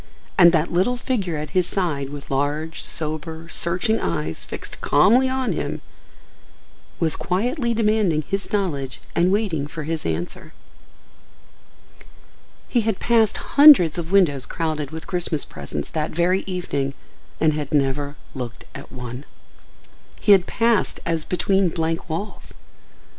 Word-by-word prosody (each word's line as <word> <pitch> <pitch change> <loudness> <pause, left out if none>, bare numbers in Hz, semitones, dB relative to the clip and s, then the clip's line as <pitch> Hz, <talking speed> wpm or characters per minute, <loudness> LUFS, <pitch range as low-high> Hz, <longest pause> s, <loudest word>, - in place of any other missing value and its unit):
And 175 -2 +7
that 165 +1 0
little 190 +8 +2
figure 205 - -2
at 150 +1 -5
his 180 -2 +2
side 155 -9 -1
with 145 -1 -9
large, 145 +4 -2
sober, 160 +1 -3
searching 185 +6 0
eyes 80 -2 -2
fixed - - -8
calmly 255 +5 +4
on 260 -1 -1
him - - -4 1.2
was 160 -3 +2
quietly 235 - -1
demanding 210 -8 +2
his 195 +6 -4
knowledge 145 -11 -2 0.2
and 175 +2 +3
waiting 190 -9 0
for 155 0 -6
his 160 0 -3
answer. 80 +2 -4 2.1
He 240 - +2
had 220 -3 -1
passed 225 -3 +3
hundreds 275 - +7
of 170 +1 -5
windows 150 -10 +3
crowded 155 -4 -2
with 160 +2 -7
Christmas 175 -5 -2
presents 70 0 -6
that 155 -1 -1
very 180 +3 +1
evening 140 -7 -2 0.4
and 155 -1 +3
had 150 -2 -4
never 145 0 0 0.2
looked 125 -3 -6
at - - -10
one. 125 0 -7 1.0
He 210 - +3
had 190 -3 +6
passed 230 -3 +1
as 165 -2 -1
between 190 0 +1
blank 165 +1 -2
walls. 185 +7 -6
165 Hz, 135 wpm, -22 LUFS, 145-195 Hz, 2.1 s, And